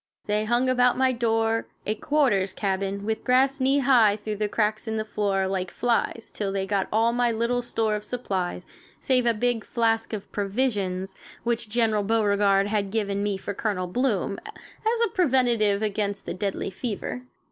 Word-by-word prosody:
They 210 0 0
hung 240 +3 +2
about 250 -1 +3
my 260 0 +3
door, 225 -1 0 0.2
a 215 - +1
"quarters" 215 -7 +1
cabin 195 0 -2
with 220 0 -2
grass 265 +2 +3
knee 265 +2 +3
high 245 -7 +5
through 210 0 -5
the 210 0 -1
cracks 215 +2 0
in 220 0 -1
the 215 - -2
floor, 200 -3 0
like 190 -1 -2
flies, 235 0 -1
till 200 -2 -2
they 195 0 -1
got 195 -1 0
all 225 +2 +3
my 240 0 +2
little 235 +2 0
store 225 -3 -1
of 210 - -4
supplies, 190 -6 -3 0.3
save 255 -2 +2
a 235 - +4
big 240 0 0
flask 225 -1 0
of 210 -3 -6
"provisions" 200 -3 -1 0.3
which 235 -2 -1
General 220 -2 +2
Beauregard 200 -2 +2
had 205 -1 -1
given 200 -2 -1
me 205 -1 0
for 200 +1 -5
Colonel 195 -3 -2
Bloom, 200 -1 -1
as 455 +1 -4
a - - -3
preventive 240 - +2
against 205 -1 -2
the - - -3
deadly 195 0 -3
fever. 230 +4 -4
215 Hz, 175 wpm, -25 LUFS, 200-240 Hz, 0.3 s, high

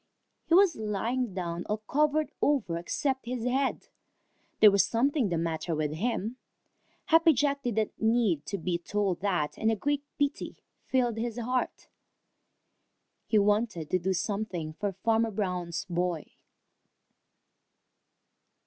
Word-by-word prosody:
He 335 - +4
was 385 -3 +5
lying 220 +3 -2
down 175 -2 -3
all 210 - -1
covered 300 +6 +1
over 265 -13 +1
except 265 +8 -2
his 245 -1 -3
head. 265 +2 0 0.7
There 210 - +9
was 200 0 +4
something 255 0 +1
the 170 - 0
matter 165 0 -2
with 150 -1 -1
him. 225 +5 -2 0.7
Happy 325 0 +5
Jack 280 +1 +1
didn't 220 -4 0
need 220 -9 +2
to 200 - -2
be 175 0 -2
told 195 0 -1
that, 175 -6 -1
and 220 - +2
a - - +1
great 285 +6 -1
pity 285 0 -2 0.3
filled 245 -3 +1
his 235 0 -3
heart. 250 +2 -2 1.4
He 220 - +3
wanted 205 -5 +1
to 185 - +3
do 190 +2 0
something 185 -4 -3
for 200 +5 -2
Farmer 225 +4 +1
Brown's 180 -5 -3
boy. 175 -2 -2
215 Hz, 130 wpm, -29 LUFS, 180-250 Hz, 1.4 s, There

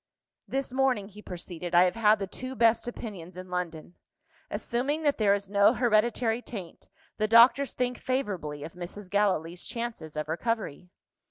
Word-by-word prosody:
"This 270 -1 -3
morning," 255 -7 +1
he 210 +1 -13
proceeded, 175 -2 -6
"I 175 - +8
have 180 - +2
had 220 -1 +4
the 195 - -3
two 255 +7 -6
best 230 -1 +3
opinions 190 -7 -7
in 185 0 -9
London. 175 -2 -4 0.5
Assuming 280 +6 -1
that 290 -4 +1
there 200 -2 +4
is 200 -1 -5
no 200 +1 +5
hereditary 235 0 +2
taint, 195 -9 -9 0.3
the 215 - +1
doctors 245 +5 +6
think 250 -1 -1
favourably 190 - -2
of 160 - -8
Mrs. 180 +2 -8
Gallilee's 180 -4 0
chances 230 -10 -5
of 150 - -2
recovery." 180 -1 -3
210 Hz, 160 wpm, -28 LUFS, 180-240 Hz, 0.5 s, I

